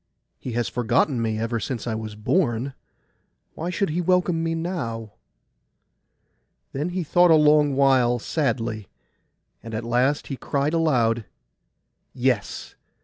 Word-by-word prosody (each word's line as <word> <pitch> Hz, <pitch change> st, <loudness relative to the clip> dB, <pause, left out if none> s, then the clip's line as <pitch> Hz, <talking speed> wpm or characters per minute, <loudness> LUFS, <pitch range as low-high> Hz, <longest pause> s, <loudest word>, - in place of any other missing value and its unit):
He 125 Hz, -, -6 dB
has 120 Hz, 0 st, 0 dB
forgotten 120 Hz, +2 st, +1 dB
me 110 Hz, -1 st, -1 dB
ever 115 Hz, +1 st, -1 dB
since 120 Hz, -2 st, -4 dB
I 120 Hz, -, -2 dB
was 110 Hz, -1 st, -5 dB
born: 120 Hz, -, 0 dB, 0.8 s
why 165 Hz, +3 st, -4 dB
should 180 Hz, -1 st, -1 dB
he 175 Hz, +3 st, 0 dB
welcome 180 Hz, -1 st, +2 dB
me 165 Hz, 0 st, -1 dB
now?' 125 Hz, -, -4 dB, 1.6 s
Then 145 Hz, +5 st, -2 dB
he 180 Hz, 0 st, -2 dB
thought 175 Hz, +3 st, +4 dB
a 160 Hz, -, +7 dB
long 150 Hz, -2 st, +4 dB
while 130 Hz, -3 st, +4 dB
sadly; 115 Hz, -6 st, -2 dB, 0.7 s
and 115 Hz, -1 st, -7 dB
at 110 Hz, -, -3 dB
the 115 Hz, -, -7 dB
last 130 Hz, +5 st, +1 dB
he 135 Hz, -, -5 dB
cried 140 Hz, +4 st, -1 dB
aloud, 120 Hz, -9 st, +2 dB, 0.9 s
'Yes! 125 Hz, -4 st, -1 dB
130 Hz, 140 wpm, -24 LUFS, 115-160 Hz, 1.6 s, a